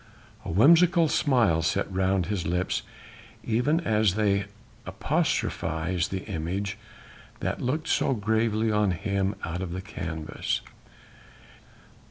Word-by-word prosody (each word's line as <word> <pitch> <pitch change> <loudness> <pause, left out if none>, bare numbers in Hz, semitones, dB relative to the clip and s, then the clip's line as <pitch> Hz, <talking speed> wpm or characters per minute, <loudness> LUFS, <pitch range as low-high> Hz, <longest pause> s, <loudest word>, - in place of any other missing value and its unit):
A - - -6
whimsical 165 - +5
smile 120 - +2
sat 85 +4 0
round 95 -1 +1
his 100 -3 -2
lips 90 +2 0 0.6
even 125 +8 +1
as 110 - +2
they 100 -2 +1 0.4
apostrophized 85 +2 -1
the 95 -1 -4
image 95 +2 -3 0.6
that - - -3
looked 155 +6 -1
so 135 - +2
gravely 110 +1 +1
on 105 -1 +2
him 100 +2 -1
out 85 +2 -3
of 90 -2 -4
the 95 - -4
canvas. 80 -4 -4
100 Hz, 115 wpm, -27 LUFS, 90-115 Hz, 0.6 s, whimsical